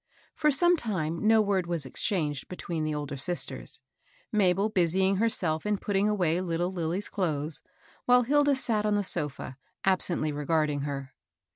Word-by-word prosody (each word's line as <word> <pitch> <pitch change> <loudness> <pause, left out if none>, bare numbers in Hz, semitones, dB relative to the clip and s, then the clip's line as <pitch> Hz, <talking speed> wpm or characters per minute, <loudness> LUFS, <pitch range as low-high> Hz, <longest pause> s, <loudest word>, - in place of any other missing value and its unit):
For 300 -1 +1
some 345 +5 +5
time 180 - -2
no 220 0 +5
word 195 -3 0
was 170 -5 +2
exchanged 150 - -1
between 170 -3 -4
the 155 -1 -2
older 145 -1 -5
sisters, 175 +6 -3 0.2
— - - -32
Mabel 200 -1 +2
busying 190 0 +1
herself 180 -8 0
in 210 -1 0
putting 200 +1 0
away 180 -4 +1
little 175 0 -2
Lilly's 175 +3 -3
clothes, 155 -5 0 0.4
while 250 0 +5
Hilda 290 +2 +3
sat 225 -5 0
on 210 -1 +1
the 205 - +1
sofii, 145 -6 -2 0.3
absently 180 -5 +1
regarding 150 0 0
her. 140 -2 -5
180 Hz, 155 wpm, -28 LUFS, 155-210 Hz, 0.4 s, some